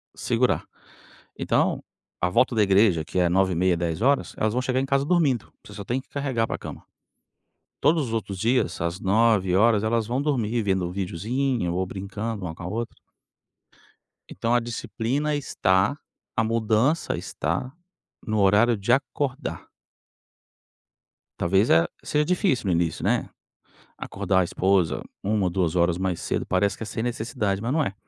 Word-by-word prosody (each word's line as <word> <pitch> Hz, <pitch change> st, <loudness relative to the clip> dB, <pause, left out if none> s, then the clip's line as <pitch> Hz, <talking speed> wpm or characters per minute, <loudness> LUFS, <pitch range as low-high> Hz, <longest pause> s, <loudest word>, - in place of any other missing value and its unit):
segurar. -, -, 0 dB, 0.7 s
Então, -, -, +1 dB, 0.4 s
a 90 Hz, -, +2 dB
volta 120 Hz, +5 st, +2 dB
da 110 Hz, -, +4 dB
igreja, 95 Hz, -5 st, +3 dB
que 80 Hz, -, -2 dB
é 90 Hz, -1 st, +3 dB
21h30, 95 Hz, -1 st, +2 dB
22:00, 90 Hz, -, 0 dB
elas 110 Hz, 0 st, 0 dB
vão 125 Hz, -, 0 dB
chegar 130 Hz, 0 st, 0 dB
em 135 Hz, -, 0 dB
casa 140 Hz, 0 st, +1 dB
dormindo, 150 Hz, -8 st, +1 dB
você 105 Hz, -, -12 dB
só 100 Hz, -1 st, -7 dB
tem 125 Hz, +6 st, -2 dB
que -, -, -33 dB
carregar 130 Hz, -6 st, -1 dB
pra -, -, -3 dB
cama. -, -, -9 dB, 1.0 s
Todos 155 Hz, -4 st, +2 dB
os -, -, -5 dB
outros 100 Hz, -4 st, -3 dB
dias, 120 Hz, +6 st, +1 dB
às 85 Hz, +2 st, -2 dB
21:00, 105 Hz, 0 st, +3 dB
elas 115 Hz, 0 st, +1 dB
vão 125 Hz, +4 st, -1 dB
dormir 120 Hz, -6 st, 0 dB
vendo 95 Hz, -3 st, 0 dB
videozinho 100 Hz, +3 st, -1 dB
ou 95 Hz, +1 st, -1 dB
brincando 100 Hz, +2 st, -5 dB
uma 80 Hz, -3 st, -4 dB
com 85 Hz, -, -11 dB
a -, -, -5 dB
outra. 115 Hz, +4 st, -4 dB, 1.4 s
Então 115 Hz, +4 st, -1 dB
a 120 Hz, -, +5 dB
disciplina 120 Hz, +5 st, -2 dB
está 100 Hz, -4 st, +1 dB, 0.4 s
a 115 Hz, -, +3 dB
mudança 115 Hz, +7 st, +1 dB
está 85 Hz, -, -3 dB, 0.5 s
no 110 Hz, -1 st, 0 dB
horário 105 Hz, +4 st, +4 dB
de 100 Hz, +5 st, +1 dB
acordar. 135 Hz, +1 st, -2 dB, 1.7 s
Talvez 95 Hz, +5 st, +2 dB
é 85 Hz, 0 st, +5 dB, 0.2 s
seja 150 Hz, 0 st, +1 dB
difícil 180 Hz, -, +1 dB
no -, -, +2 dB
início, 85 Hz, -2 st, 0 dB
né, -, -, +1 dB, 0.7 s
acordar 95 Hz, -1 st, 0 dB
a -, -, +2 dB
esposa 95 Hz, 0 st, +1 dB, 0.2 s
1 105 Hz, 0 st, 0 dB
ou 90 Hz, -, +1 dB
2 90 Hz, -2 st, 0 dB
horas 85 Hz, 0 st, +2 dB
mais 95 Hz, -2 st, -2 dB
cedo, -, -, -2 dB
parece 100 Hz, +2 st, +1 dB
que -, -, -9 dB
é -, -, -4 dB
sem 110 Hz, -, -4 dB
necessidade, 115 Hz, -4 st, -2 dB
mas 115 Hz, +4 st, -2 dB
não 155 Hz, +1 st, +2 dB
é. 100 Hz, -8 st, -2 dB
110 Hz, 160 wpm, -25 LUFS, 95-125 Hz, 1.7 s, a